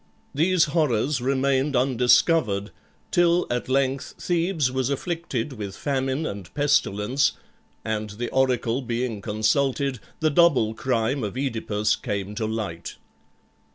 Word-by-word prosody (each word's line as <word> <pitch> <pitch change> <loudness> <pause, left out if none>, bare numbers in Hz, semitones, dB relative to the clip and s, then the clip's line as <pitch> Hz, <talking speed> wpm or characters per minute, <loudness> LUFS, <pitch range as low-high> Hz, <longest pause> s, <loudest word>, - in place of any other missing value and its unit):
These 170 +4 +3
horrors 145 -4 +1
remained 135 +2 +1
undiscovered, 125 - +3 0.4
till 175 0 +3
at 120 +1 -2
length 135 0 0
Thebes 170 -6 0
was 130 0 -1
afflicted 140 -3 -3
with 100 -5 -6
famine 135 +1 -1
and 100 - -6
pestilence, 135 -3 +2 0.5
and 110 -1 -2
the 115 +4 -5
oracle 130 -1 +1
being 120 -3 -3
consulted, 130 +5 0 0.2
the 155 -1 +2
double 140 -9 +4
crime 125 +2 -1
of 105 +1 -4
OEdipus 110 -5 0
came 100 -3 -3
to 110 0 -2
light. 105 -7 -4
130 Hz, 120 wpm, -24 LUFS, 110-140 Hz, 0.5 s, double